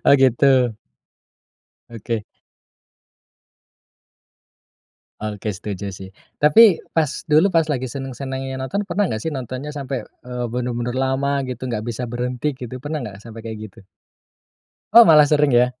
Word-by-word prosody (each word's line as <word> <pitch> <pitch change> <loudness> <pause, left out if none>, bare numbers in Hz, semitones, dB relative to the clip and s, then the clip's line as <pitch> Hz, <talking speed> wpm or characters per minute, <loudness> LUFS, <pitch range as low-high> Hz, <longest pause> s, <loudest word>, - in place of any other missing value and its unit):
Oh, - - +8
gitu. 130 -1 +3 1.5
Oke. 115 -1 -4 3.0
Oke, 105 0 -4
setuju 100 0 -5
sih. 95 0 -9 0.3
Tapi 175 +6 +6 0.2
pas 155 -4 +2 0.2
dulu 160 +6 +5
pas 165 -3 +2
lagi 130 -5 -2
seneng-senengnya 135 0 -5
nonton, 130 +11 -3
pernah 205 - 0
enggak 110 - -2
sih 155 +7 -4
nontonnya 130 +3 -5
sampai, 135 -2 -4
eee, 125 -1 -6
bener-bener 120 0 -3
lama 135 +1 0
gitu, 130 0 -5
enggak 115 -4 -3
bisa 125 +2 -4
berhenti 125 +4 -2
gitu, 125 0 -7
pernah 145 +2 -4
enggak 100 -4 -8
sampai 115 0 -9
kayak 110 -1 -6
gitu? 100 +1 -19 1.1
Oh, 235 +1 +10
malah 150 -4 +7
sering 150 -2 +3
ya? 120 +1 +5
130 Hz, 135 wpm, -21 LUFS, 120-145 Hz, 3.0 s, Oh